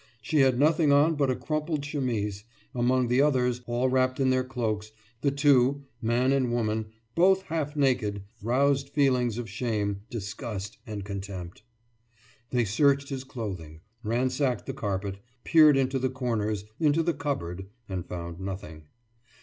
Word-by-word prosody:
She 150 +7 0
had 130 -2 +4
nothing 155 +1 +4
on 145 +3 +5
but 145 -3 +1
a 130 - +1
crumpled 155 0 -2
chemise; 115 -9 -2 0.3
among 125 +1 +2
the 125 +3 +3
others, 125 -4 +2
all 120 +2 +1
wrapped 130 0 +1
in 130 -1 +3
their 130 0 +2
cloaks, 110 -5 -3 0.3
the 140 - +3
two, 140 -1 +3 0.2
man 120 +3 +2
and 130 -3 +2
woman, 110 -2 0 0.3
both 190 +2 +4
half 155 -4 -3
naked, 125 -8 +1 0.2
roused 135 +4 +2
feelings 125 -5 +2
of 120 -2 -4
shame, 105 -5 -2
disgust, 105 -2 -5
and 105 -3 -5
contempt. 95 -2 -6 0.9
They 125 -2 +1
searched 140 +6 +2
his 135 -2 -4
clothing, 95 -12 -7 0.2
ransacked 125 +2 0
the 135 - -4
carpet, 100 -5 -3 0.2
peered 155 -4 +6
into 135 0 +1
the 130 +1 0
corners, 110 -5 -2
into 155 +1 +3
the 170 +1 +1
cupboard, 95 - -4 0.2
and 95 -2 -3
found 85 -1 -7
nothing. 95 -5 -7
125 Hz, 150 wpm, -27 LUFS, 105-140 Hz, 0.9 s, peered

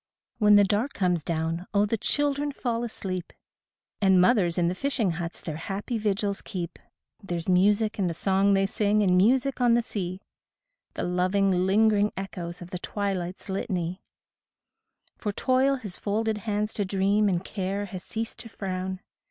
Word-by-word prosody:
14 - - -2
When 210 0 +8
the 205 - +7
dark 210 +8 0
comes 180 -4 +1
down, 165 +2 -2
oh, 200 +1 +5
the 210 - 0
children 290 +5 +1
fall 240 -4 -2
asleep, 185 -6 -5 0.7
And 190 -2 +5
mothers 180 -3 +3
in 175 -1 +2
the 175 - 0
fisher 235 -3 0
huts 170 0 -5
their 155 -3 -5
happy 200 +7 -3
vigils 205 -1 -1
keep; 175 -5 -6 0.4
There's 175 -4 -4
music 205 +4 +3
in 190 - +2
the 165 - -2
song 195 +2 +3
they 195 0 +3
sing 210 +1 +1
and 180 -2 +3
music 255 +7 +3
on 240 -1 +5
the 240 - +2
sea, 185 -3 -5 0.7
The - - -2
loving, 185 +2 +2 0.2
lingering 210 +1 +3
echoes 175 -3 -6
of 175 - -12
the 180 - -4
twilight's 190 -3 -3
litany, 185 -2 -2 1.2
For 210 - -2
toil 260 +5 +2
has 210 -9 -8
folded 215 +1 -1
hands 210 +1 -1
to 205 - 0
dream, 200 +2 +2
and 180 0 -1
care 195 0 -3
has 185 -2 -7
ceased 225 0 -5
to 230 - -7
frown. 185 -2 -4
200 Hz, 170 wpm, -27 LUFS, 180-215 Hz, 1.2 s, When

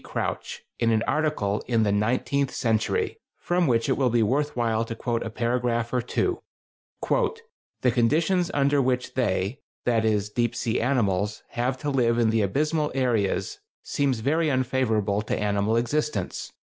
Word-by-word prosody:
Crouch, - - -4 0.2
in 115 - +2
an 110 -1 +2
article 150 -10 0
in 115 -3 +2
"The 105 - +2
Nineteenth 125 +6 0
Century," 110 -2 0 0.2
from 175 -1 +1
which 115 -1 +2
it 135 - +2
will 130 -2 +2
be 115 -1 +3
worth 145 +7 0
while 115 -2 +1
to 115 - -5
quote 115 0 -2
a - - -3
paragraph 120 0 -1
or 125 - +2
two: 355 - -1 0.7
The 455 - -2
conditions 160 +9 +2
under 140 0 +2
which 125 -1 -1
they 105 0 0 0.3
[that 115 -2 +2
is, 105 -2 0
deep 120 +1 0
sea 115 -1 -1
animals] 105 -5 0
have 125 +2 -1
to 145 - -1
live 120 -3 +2
in 115 -2 +3
the 110 -1 +2
abysmal 150 - 0
areas 125 - 0 0.2
seem 140 -2 0
very 150 +8 +1
unfavorable 120 -6 +1
to 105 - -2
animal 105 +2 +1
existence. 120 -4 -2
120 Hz, 160 wpm, -25 LUFS, 110-140 Hz, 0.7 s, be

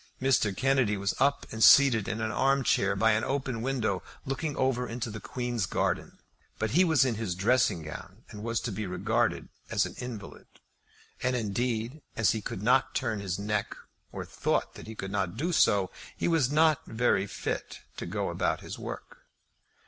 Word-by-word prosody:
Mr. 120 -7 +2
Kennedy 130 -6 +2
was 100 +1 -1
up 140 +1 +2
and 110 0 0
seated 120 -7 +7
in 110 -1 -2
an 110 0 -1
arm 135 +5 +2
chair 100 -4 +2
by 110 +3 +4
an 110 +1 +1
open 135 -4 -2
window 115 -7 -1 0.2
looking 140 +3 -3
over 125 -1 +1
into 115 -1 -4
the 110 - -6
Queen's 120 -2 -3
garden; - - -1 0.4
but 110 -1 -1
he 175 +7 +5
was 160 -6 +4
in 125 - +1
his 110 -5 -3
dressing 105 -3 +2
gown, 90 +7 -9
and 105 -2 -8
was 115 0 -1
to 120 - -4
be 105 +1 -4
regarded 90 - 0 0.2
as - - +2
an - - -7
invalid. 120 -5 -8 0.7
And 130 0 +1
indeed 120 +4 -2 0.2
as 115 - +4
he 110 - -2
could 100 - -5
not 130 +3 +3
turn 110 -5 -1
his 95 -2 -3
neck, 105 +1 -2 0.4
or - - -5
thought - - -1
that - - -11
he 110 - -7
could 95 -2 -5
not 100 -1 -1
do 165 +7 -1
so, 100 - +3 0.3
he - - 0
was 160 -6 +2
not 155 0 +4
very 110 -4 +1
fit - - -4 0.2
to - - -5
go - - -2
out - - -3
about - - -1
his - - -7
work. - - -8
115 Hz, 190 wpm, -29 LUFS, 105-130 Hz, 0.7 s, seated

